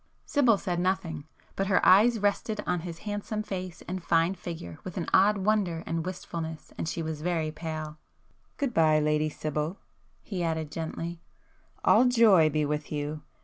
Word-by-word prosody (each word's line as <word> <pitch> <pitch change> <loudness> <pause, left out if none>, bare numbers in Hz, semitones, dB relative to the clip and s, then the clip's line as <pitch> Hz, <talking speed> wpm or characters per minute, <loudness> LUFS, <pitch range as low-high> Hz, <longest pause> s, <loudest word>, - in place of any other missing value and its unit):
Sibyl 250 -7 +3
said 175 -2 -2
nothing,—but 180 0 -3
her 190 - +4
eyes 220 +6 +6
rested 205 +1 0
on 180 -1 0
his 165 0 -7
handsome 210 +1 -3
face 185 -4 -6
and 185 0 -4
fine 165 +2 +2
figure 165 - -7
with 185 - -7
an 170 - -1
odd 205 +2 +5
wonder 190 -5 0
and 165 0 -2
wistfulness, 165 -3 -6
and 160 - -3
she 165 - -3
was 155 -1 -4
very 165 -2 -1
pale. 155 -1 -6 0.6
"Good 275 -4 -1
bye 155 -4 +4
Lady 150 0 +1
Sibyl!" 155 +4 -3 0.5
he 190 -4 -4
added 160 -2 -2
gently—"All 175 - -1
joy 220 -10 +6
be 150 0 0
with 150 0 -3
you! 150 0 -3
170 Hz, 155 wpm, -28 LUFS, 155-195 Hz, 0.6 s, eyes